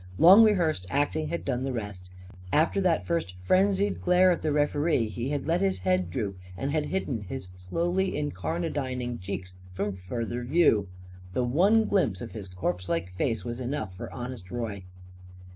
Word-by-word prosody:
Long 190 - +9
rehearsed 170 - +2
acting 145 +2 0
had 170 +2 -4
done 130 -2 -1
the 135 - -1
rest. 105 -6 -6 0.4
After 160 +6 +3
that 175 -4 +2
first 165 - -1
frenzied 195 - +2
glare 180 +1 +5
at 175 - 0
the 155 - 0
referee 145 -4 +1
he 120 +4 -3
had 145 -1 -2
let 170 +3 +1
his 195 -1 +1
head 185 0 +2
droop 100 -7 -3 0.2
and 135 +5 -2
had 150 -1 0
hidden 140 - -2
his 100 -1 -7
slowly 175 - -1
incarnadining 135 - -2
cheeks 90 0 -5 0.2
from 100 +2 -1
further 115 +6 -4
view. 125 - +3 0.5
The 125 - +1
one 195 - +4
glimpse 115 - +1
of 115 - -7
his 105 -3 -7
corpse 90 0 -3
like 85 +2 -1
face 115 +1 -1
was 120 +1 -4
enough 125 -7 -3
for - - -7
Honest 120 -6 -7
Roy. 105 -4 -4
130 Hz, 170 wpm, -28 LUFS, 105-170 Hz, 0.5 s, Long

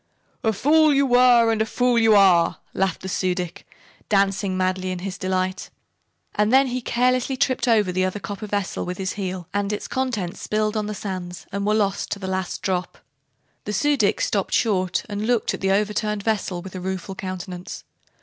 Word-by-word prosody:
"A 220 - +3
fool 305 +8 +4
you 280 0 +4
were, 245 -2 +5
and 220 -1 0
a - - +2
fool 245 +1 +2
you 225 -2 +5
are!" 185 -4 +5 0.2
laughed 190 -2 -1
the - - -4
Su 185 -1 0
dic, 180 -2 -6 0.4
dancing 195 -1 +1
madly 185 0 0
in 185 - -3
his 190 -2 -4
delight. 185 -1 -2 0.6
And 210 +1 +1
then 265 +1 +6
he 250 +1 -2
carelessly 255 +2 +1
tipped 255 0 +1
over 215 -5 +3
the 185 +1 0
other 185 +2 -1
copper 205 +4 -6
vessel 205 -2 -2
with 180 0 -5
his 190 -1 -2
heel 185 -3 -4
and 205 0 0
its 210 - -4
contents 235 -9 -2
spilled 215 0 -1
on 210 -1 -1
the 210 - -4
sands 185 -3 -6
and 200 +1 -2
were 210 - +3
lost 200 -2 0
to - - -6
the 195 - -7
last 190 -1 -3
drop. 185 -1 -2 0.7
The 210 - -3
Su 290 +8 +2
dic 210 -7 +1
stopped 200 -2 0
short 185 -5 +1
and 210 0 -3
looked 240 -2 +1
at - - -6
the 195 - +1
overturned 210 +1 0
vessel 200 -5 -1
with 190 - -9
a 185 - -6
rueful 190 +1 -4
countenance. 185 -1 -6
200 Hz, 200 wpm, -23 LUFS, 185-220 Hz, 0.7 s, then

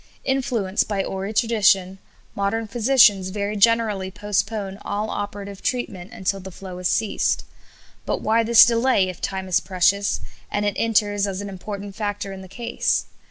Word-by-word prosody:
Influenced 240 -8 0
by 200 -2 -1
hoary 195 +2 -4
tradition, 205 -4 +2 0.3
modern 215 +3 -1
physicians 215 -4 +4
very 205 +1 -3
generally 210 -3 +2
postpone 205 0 -2
all 210 +2 -3
operative 200 -1 -5
treatment 200 -7 -3
until 195 +1 -2
the 190 0 -8
flow 185 0 -9
has 180 - 0
ceased. 185 +4 0 0.6
But - - 0
why 225 +2 +3
this 230 0 +8
delay, 230 -4 +2
if 180 - -8
time 190 -1 -3
is 180 -1 +3
precious, 195 +2 +1 0.3
and 205 0 -1
it 205 - +1
enters 205 -3 +1
as 195 -1 -4
an 205 0 -5
important 200 +1 -7
factor 205 -2 -3
in 190 - -9
the 190 - -10
case? 235 +4 -1
205 Hz, 160 wpm, -22 LUFS, 190-220 Hz, 0.6 s, this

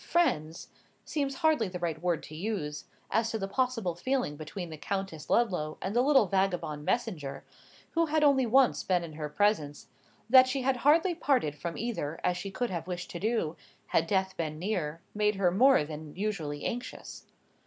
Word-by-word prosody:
—"friends" 165 - 0 0.4
seems 280 -3 -2
hardly 305 -9 +4
the 180 -1 -5
right 165 -3 -3
word 175 -2 0
to - - -10
use, 155 -6 -3 0.3
as 225 0 +2
to 225 - -2
the 195 -2 -3
possible 230 -4 0
feeling 250 - -1
between 160 +3 -7
the - - -5
Countess 190 -3 -4
Ludlow 180 -10 +1
and 195 +4 -4
the 240 - +5
little 270 -3 +5
vagabond 180 -6 -1
messenger, 155 - -2 0.5
who 330 0 +2
had 310 0 +2
only 270 -4 +4
once 260 +2 +4
been 180 -2 +1
in 165 -2 -8
her 150 -1 -5
presence,—that 205 - +2
she 260 0 -1
had 265 0 +2
hardly 325 +8 +4
parted 265 - +1
from 165 +3 -5
either 185 -10 -3
as 180 - +2
she 185 +3 -5
could 240 +3 -2
have 170 -1 -4
wished 180 -1 -5
to 175 - -5
do, 215 -7 0 0.3
had 165 - +1
death 190 0 0
been 155 -2 -3
near, 170 -4 -2
made 210 0 +1
her 190 -2 +2
more 255 - +5
than 150 0 -8
usually 175 -8 -3
anxious. 245 +1 -6
190 Hz, 180 wpm, -30 LUFS, 160-245 Hz, 0.5 s, the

